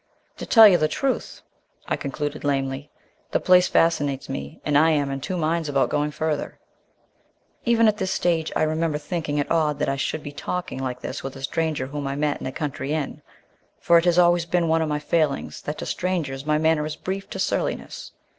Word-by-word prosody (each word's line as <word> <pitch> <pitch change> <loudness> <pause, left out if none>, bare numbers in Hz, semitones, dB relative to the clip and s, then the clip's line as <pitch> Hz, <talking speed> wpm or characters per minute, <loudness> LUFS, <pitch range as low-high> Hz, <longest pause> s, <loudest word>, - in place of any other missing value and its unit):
"To - - -7
tell 225 -2 +9
you 180 -4 +5
the 155 - +3
truth," 260 - -2 0.4
I - - 0
concluded 145 +1 -4
lamely, 135 0 -1 0.4
"the - - +1
place 180 0 +5
fascinates 145 -5 +1
me 70 +1 -6
and 150 - +1
I 155 +3 +6
am 145 -3 +1
in 135 0 -4
two 185 +6 -3
minds 165 -1 0
about 140 -1 +1
going 150 0 +1
further 150 0 -3 0.5
" - - -40
Even 230 -1 +4
at 215 -1 +2
this 190 -2 -2
stage 165 -4 0
I - - +2
remember 155 0 0
thinking 150 -1 -3
it 145 - -1
odd 155 -3 +2
that 145 - 0
I 135 - -1
should 150 +2 -2
be 145 - -6
talking 180 +1 -4
like 125 -1 -4
this 130 - -5
with 135 - -6
a 135 - -10
stranger 155 -2 -1
whom 145 +1 -5
I 135 - -2
met 145 0 -1
in - - -4
a - - -3
country 145 0 -3
inn, 155 -3 -3 0.6
for 170 0 +5
it 165 - -3
has 175 -1 +3
always 175 -1 +4
been 175 -1 +1
one 160 0 +2
of 160 - -1
my 150 - 0
failings 150 -1 -1
that 150 - -5
to - - -5
strangers 150 -7 -2
my 150 0 +3
manner 155 -1 +2
is 155 - -5
brief 195 +1 -5
to - - -6
surliness. - - -2
155 Hz, 215 wpm, -24 LUFS, 145-170 Hz, 0.6 s, tell